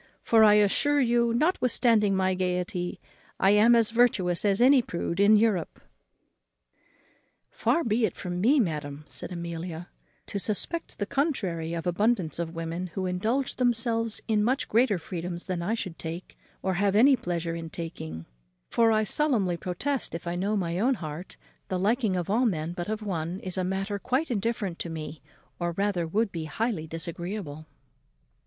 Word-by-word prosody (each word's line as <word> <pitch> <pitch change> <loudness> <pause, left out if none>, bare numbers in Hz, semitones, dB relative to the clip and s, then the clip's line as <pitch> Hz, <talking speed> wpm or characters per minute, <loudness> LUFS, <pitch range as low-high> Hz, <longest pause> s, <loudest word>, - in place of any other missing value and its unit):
for, 225 -1 +5
I 210 -1 +7
assure 210 +8 +3
you, 235 -2 +3
notwithstanding 235 - +2
my 190 0 +2
gaiety, 180 0 -2 0.4
I 195 - +5
am 220 +3 +6
as 230 -1 +3
virtuous 210 -7 +2
as 200 -1 +2
any 260 +2 +6
prude 170 -4 -4
in 205 +2 +6
Europe." 210 -5 0 1.7
"Far 335 - +1
be 225 0 +2
it - - -8
from 180 0 -4
me, 270 +8 +4
madam," 150 - -2
said 130 +7 -8
Amelia, 170 0 -6 0.4
"to 200 - -4
suspect 225 - -3
the 205 - -1
contrary 195 - -1
of 165 - -4
abundance 180 -1 +1
of 165 0 -4
women 165 +2 -4
who 190 - -2
indulge 220 +9 -1
themselves 230 -2 0
in 215 -2 +2
much 255 +5 0
greater 230 -2 +3
freedoms 175 0 -5
than 180 -2 -3
I 205 +7 0
should 185 -7 -6
take, 165 +2 -7 0.3
or 190 - 0
have 200 +2 +1
any 265 +6 +7
pleasure 175 -8 -3
in 165 -1 -6
taking; 80 - -7 0.5
for 230 -1 +4
I 215 0 +3
solemnly 215 - +1
protest, 185 +9 -3
if 165 - -7
I 170 - -2
know 200 +4 0
my 175 -2 -1
own 255 +5 +2
heart, 160 -1 -7 0.3
the 185 - -2
liking 215 +1 +1
of 175 - -2
all 235 +5 +2
men, 165 -4 -2
but 175 +2 -5
of 215 0 -3
one, 175 -2 -3
is 185 -1 -3
a 185 - 0
matter 195 +2 -2
quite 260 +8 -1
indifferent 205 -4 -2
to 170 - -4
me, 155 -2 -6 0.4
or 175 -1 -1
rather 195 -2 0
would 210 +5 0
be 165 -2 -4
highly 180 0 -2
disagreeable." 165 -1 -5
195 Hz, 170 wpm, -27 LUFS, 170-230 Hz, 1.7 s, I